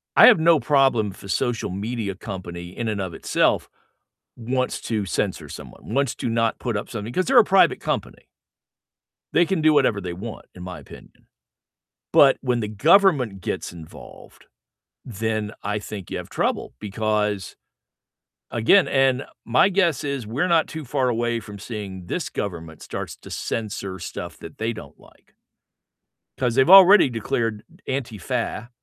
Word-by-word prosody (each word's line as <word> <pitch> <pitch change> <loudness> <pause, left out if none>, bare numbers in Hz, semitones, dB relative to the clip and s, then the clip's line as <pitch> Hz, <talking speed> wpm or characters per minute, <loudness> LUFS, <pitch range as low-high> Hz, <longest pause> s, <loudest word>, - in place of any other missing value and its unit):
I - - +9
have 230 -9 +7
no 165 -1 +5
problem 135 -8 +2
if 95 - -15
a 100 - -10
social 120 +2 -1
media 105 +1 -4
company 90 -3 -8
in 115 -2 -2
and 105 -2 -2
of 90 -3 -4
itself - - +1 0.7
wants 125 +2 -2
to 110 -4 -2
censor - - -2
someone, 110 - -9
wants 140 -3 +1
to - - -3
not 115 0 0
put 120 -3 -3
up 100 - -5
something, 115 -2 -5
'cause 185 +5 0
they're 260 -1 +4
a 225 - +8
private 195 0 +4
company. - - -4 1.1
They 175 - +4
can 170 -1 -1
do 155 0 +5
whatever 130 -8 +2
they 90 -2 -5
want, 105 +5 -8
in 90 - -10
my 90 -1 -7
opinion, - - -16 0.8
but - - +6
when 125 -3 0
the 105 - -2
government 130 - +3
gets - - -4
involved, 80 -2 -13 0.6
then 110 -1 -3
I 105 +1 -2
think 100 -3 -8
you - - -4
have - - -9
trouble, - - -2
because, 105 -2 -2 1.0
again 120 - +4
and 135 -1 +2 0.2
my 125 +11 +4
guess 175 -8 +1
is 140 -5 -3
we're 135 +12 -1
not 165 -2 +3
too 160 -2 -7
far 130 0 0
away 120 -1 0
from 105 -2 -10
seeing 95 -5 -7
this - - -3
government 80 -5 -6
starts - - -6
to - - -14
censor 100 -4 -4
stuff 85 - -7
that 80 - -11
they 115 +1 -2
don't 75 -11 -12
like. - - -23 1.0
'Cause 125 -2 0
they've 135 +5 +4
already 195 -3 +9
declared 115 -1 -2 0.2
Antifa, 120 -2 -3
115 Hz, 160 wpm, -23 LUFS, 100-135 Hz, 1.1 s, I